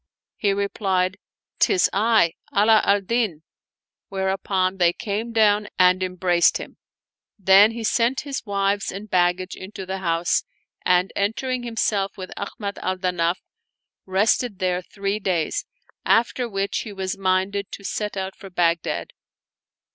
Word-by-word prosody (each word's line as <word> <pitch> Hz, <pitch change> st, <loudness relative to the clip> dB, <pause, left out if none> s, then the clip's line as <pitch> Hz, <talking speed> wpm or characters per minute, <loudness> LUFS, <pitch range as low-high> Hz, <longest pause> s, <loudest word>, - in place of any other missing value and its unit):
" -, -, -70 dB
He 205 Hz, -, +1 dB
replied, 195 Hz, -2 st, 0 dB, 0.2 s
" -, -, -52 dB
'Tis 385 Hz, -, +4 dB
I! 215 Hz, -5 st, +3 dB, 0.2 s
Ala 215 Hz, +2 st, +6 dB
al 200 Hz, 0 st, +3 dB
Din! 200 Hz, -6 st, -1 dB, 0.3 s
" -, -, -70 dB
whereupon 190 Hz, -1 st, -1 dB
they 175 Hz, -2 st, +3 dB
came 220 Hz, +3 st, -3 dB
down 210 Hz, -2 st, +3 dB
and 185 Hz, 0 st, +5 dB
embraced 180 Hz, -1 st, +2 dB
him. -, -, -10 dB, 0.6 s
Then 195 Hz, +1 st, +6 dB
he 230 Hz, 0 st, -5 dB
sent 235 Hz, +4 st, +1 dB
his 280 Hz, -2 st, -5 dB
wives 200 Hz, -1 st, 0 dB
and 200 Hz, +2 st, -8 dB
baggage 180 Hz, +1 st, +1 dB
into 190 Hz, 0 st, -8 dB
the 190 Hz, +1 st, -4 dB
house, 170 Hz, -1 st, +1 dB, 0.4 s
and 180 Hz, +1 st, +2 dB
entering 245 Hz, +5 st, -1 dB
himself 220 Hz, -4 st, -1 dB
with 185 Hz, -1 st, -7 dB
Ahmad 200 Hz, 0 st, -5 dB
al 185 Hz, 0 st, -2 dB
Danaf, 180 Hz, -2 st, 0 dB, 0.7 s
rested 205 Hz, +3 st, +1 dB
there 180 Hz, -1 st, 0 dB
three 200 Hz, +3 st, -3 dB
days, 180 Hz, -6 st, -1 dB, 0.4 s
after 240 Hz, +1 st, +2 dB
which 195 Hz, -1 st, -1 dB
he 215 Hz, -, -6 dB
was 190 Hz, -1 st, -3 dB
minded 195 Hz, +1 st, 0 dB
to -, -, -8 dB
set 210 Hz, +1 st, -3 dB
out 190 Hz, 0 st, -4 dB
for 195 Hz, -, -11 dB
Bagh 170 Hz, -2 st, +2 dB
dad. -, -, -4 dB
195 Hz, 145 wpm, -23 LUFS, 185-210 Hz, 0.7 s, Ala